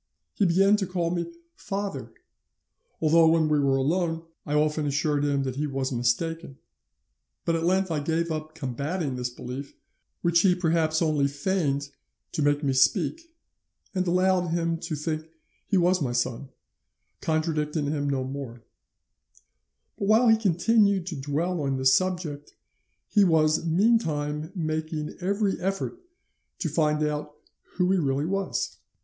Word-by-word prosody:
He 200 - +2
began 195 +4 +4
to 195 -3 -2
call 175 -2 -1
me 170 -1 -2 0.3
'father,' 200 0 -5 0.9
although 165 +1 +5
when 160 -1 +4
we 150 -1 +2
were 135 -1 +2
alone 165 +4 0 0.2
I 150 - 0
often 150 0 +1
assured 145 +1 0
him 140 -1 +1
that 130 -1 -4
he 150 +1 -1
was 135 -1 -2
mistaken; 135 +5 -1 0.9
but 165 - +1
at 165 0 -1
length 190 0 +2
I 155 - 0
gave 165 +3 -1
up 155 0 -5
combating 140 +1 -3
this 125 0 -2
belief, 125 +3 -8 0.5
which 170 0 +4
he 180 0 +4
perhaps 165 -2 +1
only 150 -3 +2
feigned 145 -1 -1 0.4
to - - -2
make 145 +1 +2
me 135 -2 +1
speak, 320 - +1 0.6
and 185 -1 -1
allowed 180 0 +2
him 165 0 -1
to 160 - -4
think 155 +1 -4 0.4
he 195 - +2
was 180 0 +3
my 125 -4 -1
son, 120 +2 -2 0.7
contradicting 155 -1 -1
him 145 -1 -1
no 135 -2 0
more; 130 -3 -7 1.4
but 200 - -1
while 225 +3 +5
he 225 - +7
continued 200 -1 +2
to 180 -3 -5
dwell 150 +5 -2
on 135 -1 -1
this 130 0 +4
subject 175 -6 -1 0.5
he 205 - +4
was 160 -2 +3
meantime 160 -6 +1
making 155 -2 -3
every 200 +2 0
effort 195 - -3 0.6
to 165 - -2
find 150 0 +1
out 150 0 -3 0.4
who 180 0 +2
he 190 - +3
really 140 -1 0
was. 195 +3 -2
160 Hz, 150 wpm, -26 LUFS, 145-180 Hz, 1.4 s, he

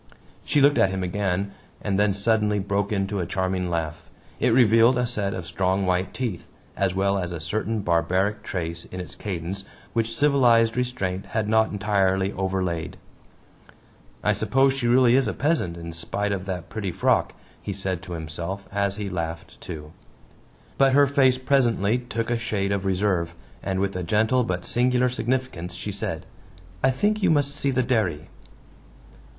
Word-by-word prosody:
She 145 - +2
looked 145 +1 +5
at 95 - +5
him 95 -1 -2
again, 95 +1 -1 0.3
and 100 -1 -1
then 105 -2 +3
suddenly 105 0 +2
broke 100 +1 -1
into 100 0 -1
a 90 - -2
charming 95 -1 -1
laugh. 80 -3 -3 0.3
It - - +3
revealed 115 +1 +5
a 125 - +1
set 105 -4 -2
of 90 - -5
strong 95 +2 0
white 90 0 0
teeth, 115 -9 -4 0.3
as 95 -2 0
well 100 +1 +1
as 90 -1 -3
a 85 - -4
certain 105 +7 -2
barbaric 90 +4 +1
trace 85 -2 -4
in 95 - -8
its 90 - -6
cadence 95 0 -5 0.3
which 115 0 -1
civilized 120 -5 +4
restraint 100 -7 -2
had 110 +1 -1
not 110 0 +3
entirely 100 -2 +1
overlaid. 95 -3 -2 1.3
"I - - +3
suppose 135 0 +2
she 135 -3 -1
really 120 0 +5
is 135 +1 +4
a - - -1
peasant, 145 - 0
in 85 -1 -7
spite 100 +5 -2
of 95 -2 -2
that 90 -2 -4
pretty 100 -4 -3
frock," - - +1 0.3
he 100 - -4
said 95 -2 -3
to 95 -1 -8
himself 85 +4 -5
as 100 -1 0
he 105 -1 -4
laughed 80 -2 -5
too. 75 -5 -8 0.9
But 135 -1 +5
her 145 +1 +6
face 135 -2 +3
presently 125 -5 +2
took 120 -1 -3
a 120 - +1
shade 100 -4 -1
of 100 -1 -1
reserve, 90 -3 0 0.3
and 95 -1 -2
with 100 0 -1
a 90 - -2
gentle 110 +8 +2
but 90 -4 -3
singular 125 +1 +2
significance 125 -9 -2
she - - -4
said: - - -4 0.6
"I - - +5
think 210 +11 +1
you 190 - +3
must 145 -2 +2
see 140 - 0
the 130 -1 +1
dairy." 105 - 0
100 Hz, 170 wpm, -24 LUFS, 90-120 Hz, 1.3 s, her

